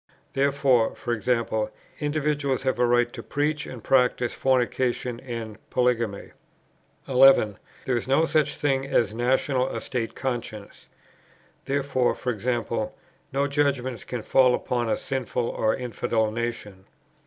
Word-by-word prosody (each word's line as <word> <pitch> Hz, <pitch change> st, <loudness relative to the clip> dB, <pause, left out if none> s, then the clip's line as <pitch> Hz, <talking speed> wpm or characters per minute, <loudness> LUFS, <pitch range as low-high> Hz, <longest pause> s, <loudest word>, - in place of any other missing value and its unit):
Therefore, 135 Hz, -4 st, +2 dB, 0.2 s
e.g. 115 Hz, +3 st, -2 dB, 0.7 s
individuals 145 Hz, -3 st, 0 dB
have 130 Hz, -2 st, 0 dB
a 125 Hz, -, +4 dB
right 120 Hz, 0 st, +2 dB
to -, -, -6 dB
preach 150 Hz, +1 st, -1 dB
and 120 Hz, -4 st, -9 dB
practise 125 Hz, -2 st, +2 dB
fornication 125 Hz, -1 st, 0 dB
and 115 Hz, -4 st, -6 dB
polygamy. 120 Hz, -5 st, 0 dB, 0.8 s
11. 130 Hz, -6 st, +5 dB, 0.3 s
There 130 Hz, -, +1 dB
is 120 Hz, -, -4 dB
no 135 Hz, +5 st, +4 dB
such 155 Hz, -2 st, +1 dB
thing 135 Hz, -2 st, 0 dB
as 115 Hz, -6 st, +2 dB
a -, -, -10 dB
national 130 Hz, +2 st, +1 dB
or -, -, -4 dB
state 120 Hz, -3 st, -3 dB
conscience. 120 Hz, -5 st, -5 dB, 0.8 s
Therefore, 135 Hz, -2 st, 0 dB, 0.2 s
e.g. 120 Hz, +3 st, -1 dB, 0.7 s
no 140 Hz, +1 st, +1 dB
judgments 140 Hz, -5 st, 0 dB
can 120 Hz, -3 st, -5 dB
fall 125 Hz, -2 st, +4 dB
upon 120 Hz, -2 st, -2 dB
a -, -, +1 dB
sinful 125 Hz, -3 st, -2 dB
or 110 Hz, -2 st, 0 dB
infidel 115 Hz, -3 st, -1 dB
nation. 110 Hz, -4 st, -5 dB
125 Hz, 130 wpm, -25 LUFS, 120-135 Hz, 0.8 s, 11